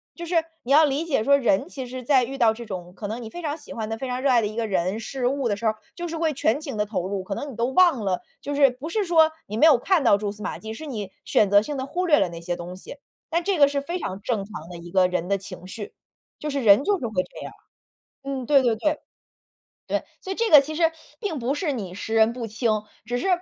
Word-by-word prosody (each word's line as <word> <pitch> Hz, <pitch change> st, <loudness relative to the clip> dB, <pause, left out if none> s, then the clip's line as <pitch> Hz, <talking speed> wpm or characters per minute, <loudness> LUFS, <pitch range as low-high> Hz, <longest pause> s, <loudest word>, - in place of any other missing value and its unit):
就 340 Hz, -, -6 dB
是 345 Hz, +1 st, -3 dB, 0.3 s
你 255 Hz, -, -4 dB
要 305 Hz, +2 st, +8 dB
理 290 Hz, +2 st, +1 dB
解 280 Hz, -9 st, +1 dB
说 280 Hz, +4 st, +5 dB
人 260 Hz, -, +1 dB
其 265 Hz, -7 st, -6 dB
实 255 Hz, 0 st, -7 dB
在 260 Hz, -1 st, +4 dB
遇 270 Hz, +3 st, -6 dB
到 225 Hz, -4 st, +4 dB
这 235 Hz, +1 st, -9 dB
种 180 Hz, -4 st, -7 dB
可 205 Hz, +2 st, -6 dB
能 230 Hz, +4 st, -5 dB
你 220 Hz, -, -7 dB
非 350 Hz, -, -8 dB
常 305 Hz, -2 st, -3 dB
喜 310 Hz, -, -14 dB
欢 220 Hz, -2 st, -4 dB
的、 225 Hz, +1 st, -3 dB
非 260 Hz, +2 st, -5 dB
常 250 Hz, +1 st, -2 dB
热 280 Hz, -, +2 dB
爱 245 Hz, -2 st, +5 dB
的 210 Hz, -, 0 dB
一 215 Hz, +2 st, -8 dB
个 230 Hz, -1 st, 0 dB
人、 190 Hz, +2 st, 0 dB
事 245 Hz, +2 st, -2 dB
物 275 Hz, -1 st, 0 dB
的 205 Hz, -, 0 dB
时 205 Hz, -, -7 dB
候 220 Hz, -, +4 dB
儿， 215 Hz, -, -13 dB, 0.2 s
就 345 Hz, -1 st, -5 dB
是 330 Hz, -, -4 dB
会 320 Hz, -1 st, +1 dB
全 270 Hz, 0 st, +1 dB
情 290 Hz, -6 st, -6 dB
地 210 Hz, 0 st, 0 dB
投 185 Hz, -4 st, -3 dB
入， 195 Hz, -1 st, -3 dB
可 195 Hz, +1 st, -4 dB
能 290 Hz, -, -5 dB
你 -, -, -10 dB
都 235 Hz, +2 st, 0 dB
忘 305 Hz, -, +4 dB
了， 185 Hz, -2 st, 0 dB, 0.2 s
就 290 Hz, -, -4 dB
是 280 Hz, -1 st, +5 dB
不 255 Hz, +5 st, -7 dB
是 415 Hz, +3 st, 0 dB
说 320 Hz, -2 st, +5 dB, 0.2 s
你 210 Hz, -, -5 dB
没 235 Hz, -, +5 dB
有 300 Hz, -5 st, +7 dB
看 330 Hz, +4 st, +2 dB
到 205 Hz, -4 st, +5 dB
蛛 205 Hz, 0 st, -3 dB
丝 210 Hz, 0 st, -10 dB
马 -, -, -3 dB
迹， 220 Hz, 0 st, -6 dB
是 315 Hz, -, -8 dB
你 210 Hz, -7 st, -5 dB
选 205 Hz, -, +3 dB
择 205 Hz, +1 st, +6 dB
性 290 Hz, +6 st, -4 dB
地 260 Hz, -, -3 dB
忽 355 Hz, +6 st, -2 dB
略 315 Hz, -4 st, +5 dB
了 195 Hz, -, +2 dB
那 170 Hz, 0 st, -8 dB
些 175 Hz, +1 st, -2 dB
东 175 Hz, +1 st, -7 dB
西。 190 Hz, +9 st, -10 dB, 0.3 s
但 335 Hz, +1 st, +1 dB
这 395 Hz, -1 st, 0 dB
个 285 Hz, -2 st, +7 dB
是 280 Hz, 0 st, -1 dB
非 340 Hz, +6 st, -4 dB
常 190 Hz, -, -5 dB
正 210 Hz, -2 st, -1 dB
常 195 Hz, -6 st, -9 dB
的 180 Hz, -, -8 dB
一 170 Hz, 0 st, -10 dB
个 185 Hz, -1 st, +4 dB
人 180 Hz, 0 st, -2 dB
的 200 Hz, -, +2 dB
情 185 Hz, -1 st, -10 dB
绪， 205 Hz, +1 st, -7 dB, 0.5 s
就 300 Hz, -, -4 dB
是 280 Hz, -1 st, -1 dB
人 215 Hz, +2 st, +6 dB
就 400 Hz, +3 st, +1 dB
是 255 Hz, -, -4 dB
会 185 Hz, -4 st, 0 dB
这 -, -, -13 dB
样， -, -, -8 dB, 0.7 s
嗯， 270 Hz, -2 st, -3 dB
对 275 Hz, -1 st, +5 dB
对 235 Hz, -3 st, +2 dB
对。 300 Hz, +6 st, 0 dB, 0.9 s
对， -, -, -1 dB, 0.2 s
所 380 Hz, -, -6 dB
以 -, -, -2 dB
这 460 Hz, +2 st, 0 dB
个 295 Hz, -3 st, +9 dB
其 310 Hz, +3 st, -6 dB
实 325 Hz, 0 st, +3 dB, 0.3 s
并 390 Hz, -, -3 dB
不 250 Hz, +3 st, 0 dB
是 295 Hz, -2 st, -1 dB
你 195 Hz, -7 st, -5 dB
识 220 Hz, +3 st, -4 dB
人 220 Hz, +1 st, +5 dB
不 235 Hz, -1 st, -5 dB
清， 215 Hz, -1 st, 0 dB, 0.2 s
只 245 Hz, +2 st, -2 dB
是 245 Hz, -, -2 dB
245 Hz, 315 characters per minute, -24 LUFS, 210-295 Hz, 0.9 s, 个